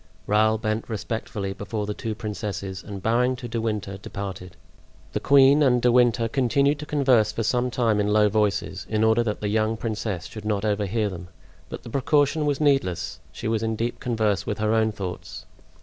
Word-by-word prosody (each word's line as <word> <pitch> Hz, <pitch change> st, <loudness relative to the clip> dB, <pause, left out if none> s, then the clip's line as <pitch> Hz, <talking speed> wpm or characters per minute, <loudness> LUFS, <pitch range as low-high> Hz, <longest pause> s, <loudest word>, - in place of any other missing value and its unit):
Raoul 110 Hz, +1 st, +3 dB
bent 110 Hz, +1 st, -2 dB
respectfully 105 Hz, -2 st, -4 dB
before 105 Hz, +1 st, -4 dB
the 105 Hz, -, -3 dB
two 110 Hz, 0 st, -4 dB
princesses, 100 Hz, -3 st, -5 dB
and 100 Hz, 0 st, -8 dB
bowing 125 Hz, +3 st, +2 dB
to 125 Hz, -1 st, -7 dB
De 115 Hz, 0 st, -3 dB
Winter, 105 Hz, -3 st, -3 dB
departed. 95 Hz, -4 st, -7 dB, 0.6 s
The -, -, 0 dB
queen 140 Hz, +1 st, +5 dB
and 125 Hz, -4 st, +4 dB
De 125 Hz, 0 st, +3 dB
Winter 120 Hz, -1 st, +3 dB
continued 140 Hz, +4 st, +1 dB
to 150 Hz, -, -7 dB
converse 130 Hz, -8 st, +3 dB
for 115 Hz, -, -3 dB
some 125 Hz, +3 st, +1 dB
time 115 Hz, -4 st, +1 dB
in 105 Hz, -, +1 dB
low 105 Hz, 0 st, +4 dB
voices, 100 Hz, -3 st, -1 dB
in 110 Hz, 0 st, +1 dB
order 110 Hz, +1 st, +4 dB
that 105 Hz, -3 st, -2 dB
the 105 Hz, -, -1 dB
young 110 Hz, +1 st, +1 dB
princess 110 Hz, -5 st, -3 dB
should 110 Hz, -, -9 dB
not 105 Hz, -1 st, -1 dB
overhear 105 Hz, +1 st, 0 dB
them; 90 Hz, -3 st, -7 dB, 0.4 s
but -, -, -7 dB
the -, -, -9 dB
precaution 145 Hz, +3 st, +2 dB
was 145 Hz, -2 st, 0 dB
needless: 90 Hz, -, +1 dB
she -, -, -6 dB
was 110 Hz, -1 st, 0 dB
in 110 Hz, 0 st, -1 dB
deep 115 Hz, +2 st, -3 dB
converse 110 Hz, -5 st, 0 dB
with 105 Hz, -, -3 dB
her 110 Hz, 0 st, +1 dB
own 110 Hz, -1 st, +2 dB
thoughts. 95 Hz, -4 st, -7 dB
110 Hz, 195 wpm, -24 LUFS, 105-120 Hz, 0.6 s, queen